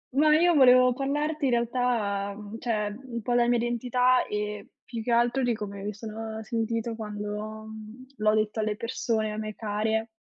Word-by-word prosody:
Ma 305 +1 +5
io 345 +1 +4
volevo 255 -2 +7
parlarti 295 +3 -1
in 255 - +2
realtà, 235 -4 0
uhm, 210 +1 -8
cioè, 210 -3 -1
un 235 -2 -4
po' 240 +3 -1
della 240 0 +4
mia 240 - +3
identità 250 +2 +2
e 210 0 -4 0.2
più 230 -2 -5
che 240 - -2
altro 240 +3 +3
di 240 -1 +2
come 200 -2 -6
mi 210 +1 -3
sono 220 +1 -6
sentito 230 0 -2
quando, 210 0 -5
mhmm, 220 +3 -10
l'ho 215 0 +3
detto 215 0 0
alle 215 -1 -1
persone 225 -2 -1
a - - -5
me 215 0 -4
care 220 +1 -1
225 Hz, 180 wpm, -27 LUFS, 215-245 Hz, 0.2 s, volevo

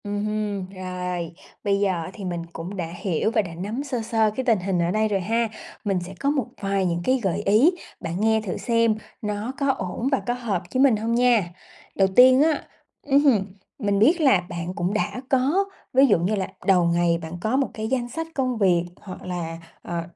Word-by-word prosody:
Ừm 205 0 -2
hừm, 210 -3 -2
rồi, 180 -3 -4 0.3
bây 200 -2 +1
giờ 200 -1 +2
á - - -7
thì 200 - -7
mình 175 -2 -3
cũng 180 +5 -6
đã 175 - -2 0.2
hiểu 190 +3 0
và 225 - +3
đã 170 -5 -8
nắm 210 +10 -4
sơ 260 -5 -3
sơ 220 -1 +1
cái 260 - -2
tình 225 -5 +3
hình 185 0 -1
ở 170 +1 +1
đây 215 +2 +2
rồi 200 -2 0
ha, 225 +4 0 0.4
mình 195 -3 +1
sẽ 180 +2 -8
có 280 - +1
một 280 -5 +1 0.2
vài 195 -1 0
những 170 -1 0
cái 260 +5 +2
gợi 190 +1 0
ý, 215 - +5 0.3
bạn 170 +2 -4
nghe 220 0 +3
thử 200 -4 -4
xem 230 -2 +2 0.3
nó 210 +3 -3
có 280 -1 +1
ổn 195 +2 -3
và 270 - +3
có 245 - +2
hợp 230 -8 -2
với 260 - +3
mình 265 -5 +5
hông 225 +2 -2
nha? 240 -7 +3 0.5
Đầu 195 - +4
tiên 255 +1 +8
á, 310 0 +2 0.4
ừm 280 0 +5
hứm, 225 -9 +4 0.3
mình 205 -4 +1
biết 320 - +4
là 260 - +5
bạn 175 +1 -4
cũng 185 0 -1
đã 215 +3 -1
có 280 +9 +2 0.3
ví 265 +2 +6
dụ 205 -10 +4
như 185 +6 0
là 190 -2 -2 0.2
đầu 185 -3 +4
ngày 170 0 +2
bạn 160 0 -7
có 220 +6 0
một 275 - +1
cái 220 0 -4
danh 240 0 -1
sách 325 +5 -4
công 255 -3 0
việc, 180 -4 +3 0.2
hoặc 185 -3 -9
là, 170 -2 -4 0.2
ờ, 170 -1 -3
210 Hz, 225 wpm, -24 LUFS, 180-245 Hz, 0.5 s, tiên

